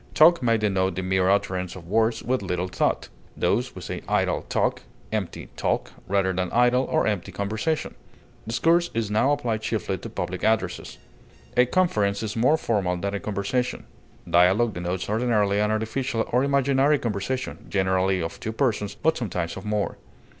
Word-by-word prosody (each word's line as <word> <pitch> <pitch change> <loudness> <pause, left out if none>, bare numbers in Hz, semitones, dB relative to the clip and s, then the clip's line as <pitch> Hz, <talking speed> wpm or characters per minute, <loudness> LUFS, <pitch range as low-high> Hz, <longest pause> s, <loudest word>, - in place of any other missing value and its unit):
Talk 165 +1 +6
may 115 -2 +3
denote 95 -4 0
the 95 - -3
mere 95 0 +2
utterance 95 -2 0
of 85 -2 -11
words 110 +3 +1
with 130 -1 0
little 90 -1 -2
thought; 90 - -1 0.3
thus, - - 0
we - - -8
say - - -5
idle - - +1
talk, - - 0 0.3
empty 105 -5 -4
talk, - - -1 0.2
rather 95 -1 +1
than 90 0 -1
idle 125 +2 +3
or - - +1
empty 100 -3 -1
conversation. 105 - -2 0.5
Discourse 165 +9 +2
is 110 -3 -1
now 110 +7 +3
applied 120 -7 -1
chiefly 110 -4 -2
to - - -7
public - - -4
addresses. 110 0 0 0.6
A 125 0 +5
conference 105 - +1
is 105 -1 -3
more 130 +8 +4
formal 100 - 0
than 100 +3 -3
a 100 - -2
conversation. 105 +5 -2 0.4
Dialog 95 +6 +4
denotes 90 +2 -3
ordinarily 105 -2 +1
an 105 0 +2
artificial 110 +2 -1
or 125 +2 +3
imaginary 140 +1 +3
conversation, 120 +3 -3
generally 95 -1 +1
of 80 - -5
two 110 - -4
persons, 110 -5 0
but 160 0 +1
sometimes 90 - -3
of - - -8
more. 105 -1 -1
105 Hz, 165 wpm, -25 LUFS, 95-125 Hz, 0.6 s, Talk